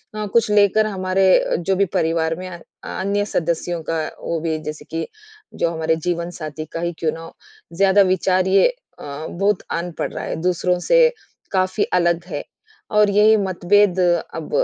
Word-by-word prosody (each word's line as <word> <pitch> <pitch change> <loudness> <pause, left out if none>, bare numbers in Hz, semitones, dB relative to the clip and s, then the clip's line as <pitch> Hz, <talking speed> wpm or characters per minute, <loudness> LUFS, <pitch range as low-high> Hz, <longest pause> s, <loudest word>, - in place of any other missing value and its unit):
अ, 215 0 -3
कुछ 230 -2 +3
लेकर 210 +1 +4
हमारे 190 -2 0
अ, - - -1
जो 190 +3 0
भी 200 +1 +2
परिवार 165 0 0
में 185 +2 -7
अ 180 - -8
अ, - - -19 0.4
अन्य 200 +2 0
सदस्यों 170 -2 -2
का, 165 -1 0 0.2
वो 170 - -2
भी 160 -1 -1
जैसे 150 - -8
कि 165 0 -3 0.5
जो 170 - 0
हमारे 160 0 0
जीवनसाथी 170 -3 -4
का - - -3
ही 170 0 -2
क्यों 160 -2 0
ना 165 - -8
हो, 165 - -11 0.4
ज़्यादा 195 +3 +4
विचार, 185 0 +1
ये 195 +1 +5 0.3
अ, 145 +2 -7
बहुत 200 +2 0
आन 170 +1 -2
पड़ - - -2
रहा - - -5
है, - - -3
दूसरों 180 0 +1
से - - +6 0.4
काफ़ी 185 +1 +1
अलग 170 -1 +2
है। 145 -5 -5 0.5
और 210 -1 +5
यही 210 +2 +5
मतभेद 190 0 +2 0.4
अब 160 - -6
180 Hz, 180 wpm, -20 LUFS, 165-195 Hz, 0.5 s, से